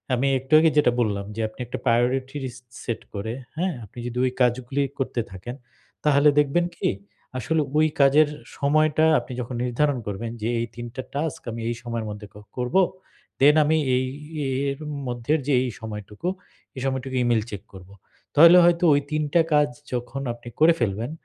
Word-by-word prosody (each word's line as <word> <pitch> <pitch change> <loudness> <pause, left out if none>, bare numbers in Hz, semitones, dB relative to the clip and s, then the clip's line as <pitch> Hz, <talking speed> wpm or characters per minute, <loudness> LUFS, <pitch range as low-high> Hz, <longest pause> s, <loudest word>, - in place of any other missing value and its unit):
আমি 130 +3 +1
একটু 135 +3 -6
আগে 160 +1 +5
যেটা 145 -5 +5
বললাম, 100 -4 0
যে 115 - -2
আপনি 110 - -17
একটা 120 - -5
প্রায়োরিটি 130 +3 +1
র - - -6
ইস 125 - -12 0.3
সেট 115 - -3
করে, 110 +2 -4 0.2
হ্যাঁ? 180 +3 -1
আপনি 105 +4 -12
যদি 120 0 -5
ওই 130 - +1
কাজগুলি 125 +3 +1 0.2
করতে 125 -2 -1
থাকেন, 95 +7 -7 0.5
তাহলে 150 0 +5
দেখবেন 150 +4 +2
কি? - - 0 0.5
আসলে 160 +5 0 0.2
ওই 155 0 +5
কাজের 145 +3 +6 0.3
সময়টা 155 +2 +3
আপনি 130 - -9
যখন 125 +1 -6
নির্ধারণ 130 +3 +1
করবেন, 105 +3 -4
যে 110 - -1
এই 115 - -2
৩ 120 0 -6
টা 130 - -3
টাস্ক 145 +1 -2
আমি 115 +1 -6
এই 120 - -2
সময়ের 115 -2 -3
মধ্যে 105 0 -7
ক - - -28 0.2
করব, 125 +3 -3 0.7
দেন 145 +2 +7
আমি 160 +2 +3 0.2
এই 130 - +1 0.7
এর 140 - -3 0.3
মধ্যে 120 +3 -1
যে 145 - +2
এই 130 - -2
সময়টুকু, 105 - -6 0.5
এই 130 - -6
সময়টুকু 130 0 -2
E-mail 120 -2 +2
চেক 100 -3 -6
করব। 95 -1 -12 0.5
তাহলে 170 +4 +9
হয়তো 175 0 +3
ওই 145 - +3
৩ 155 0 0
টা 170 - +6
কাজ 150 -1 +4 0.2
যখন 125 +3 -3
আপনি 120 0 -11
করে 160 +2 +6
ফেলবেন, 115 +3 -1
125 Hz, 185 wpm, -24 LUFS, 115-150 Hz, 0.7 s, তাহলে